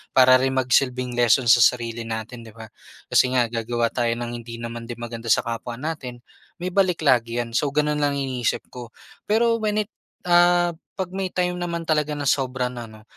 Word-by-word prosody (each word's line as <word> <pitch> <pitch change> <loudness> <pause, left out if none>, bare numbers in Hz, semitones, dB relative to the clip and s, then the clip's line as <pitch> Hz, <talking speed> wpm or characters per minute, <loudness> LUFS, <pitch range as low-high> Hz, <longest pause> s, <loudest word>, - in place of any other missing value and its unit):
Para 130 0 +7
rin 135 0 0
magsilbing 125 0 +1
lesson 120 +1 +3
sa 120 - +6
sarili 115 -1 +1
natin, 115 +2 -5
'di 110 - -14
ba, 110 -2 -11 0.4
kasi 130 0 +3
nga 120 -2 +2
gagawa 115 0 -1
tayo 120 -2 0
ng 120 0 -5
hindi 120 -1 -7
naman 115 0 -6
din 120 - -6
maganda 115 0 -7
sa 110 - +3
kapwa 115 +1 -5
natin, 130 -3 -6 0.3
may 180 +1 -4
balik 180 -4 +1
lagi 120 -3 +2
'yan. 120 -1 -3
So, 140 +3 +1
gano'n 150 +1 0
lang 145 -1 +1
iniisip 130 -4 -2
ko. 120 -2 -8 0.4
Pero, 230 +2 +2
when 210 -1 0
it - - -34 0.4
ah, 175 0 +4 0.3
'pag 190 -2 -3
may 190 0 -2
time 180 0 -1
naman 170 -1 -3
talaga 150 -2 0
na 145 - -4
sobra 130 -2 0
na, 120 -2 -7
'no, 110 0 -15
125 Hz, 195 wpm, -23 LUFS, 120-150 Hz, 0.4 s, Para